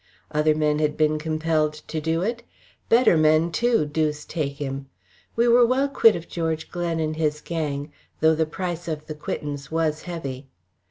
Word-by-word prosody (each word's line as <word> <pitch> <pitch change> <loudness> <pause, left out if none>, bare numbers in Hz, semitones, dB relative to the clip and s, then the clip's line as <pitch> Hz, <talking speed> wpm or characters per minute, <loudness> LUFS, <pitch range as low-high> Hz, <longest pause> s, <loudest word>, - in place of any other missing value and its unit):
Other 150 0 +2
men 150 -1 +1
had 150 -1 0
been 155 0 +2
compelled 155 -1 0
to 155 +1 -6
do 165 +2 0
it 235 +3 -2 0.5
better 235 -5 +5
men 155 +2 +4
too, 235 -3 +2
deuce 150 0 -1
take 145 -4 -3
him! 135 -1 -5 0.5
We 235 +1 +3
were 240 +1 +6
well 260 +4 +2
quit 230 -5 +5
of 170 -1 -6
George 160 -2 -3
Glen 170 -2 -2
and 155 -1 -1
his 150 -2 0
gang, 150 -2 -4 0.3
though 160 +1 +5
the 160 0 0
price 175 +1 -4
of 155 -2 -4
the 155 - -5
quittance 145 -2 -5
was 160 -1 0
heavy. 140 -7 -6
155 Hz, 175 wpm, -24 LUFS, 150-170 Hz, 0.5 s, were